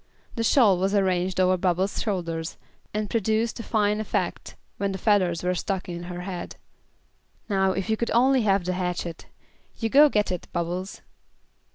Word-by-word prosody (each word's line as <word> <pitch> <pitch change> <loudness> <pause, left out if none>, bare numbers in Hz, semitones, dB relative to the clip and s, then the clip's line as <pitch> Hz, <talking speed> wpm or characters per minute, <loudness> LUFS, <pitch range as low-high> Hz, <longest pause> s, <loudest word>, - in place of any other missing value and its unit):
The 230 - -2
shawl 215 -6 +4
was 195 +2 +1
arranged 185 -1 +1
over 185 0 +4
Bubbles' 185 +2 0
shoulders, 170 -6 -3 0.3
and 210 0 -2
produced 220 +2 0
a - - -3
fine 210 -2 +1
effect, 215 - -3 0.2
when 200 -1 -1
the - - -3
feathers 185 -5 +2
were 180 0 +1
stuck 190 +1 -3
in 175 -1 -6
her 175 0 -6
head. 180 -1 -6 0.9
"Now 190 -1 +2
if 190 -1 -3
you 220 - +2
could 235 +1 -2
only 260 +2 +4
have 195 -4 +2
the 185 - 0
hatchet. 180 -2 -4 0.5
You 225 - -1
go 290 +5 +7
get 210 -6 +1
it, 180 - -4
Bubbles." 175 +3 -4
190 Hz, 170 wpm, -25 LUFS, 180-215 Hz, 0.9 s, go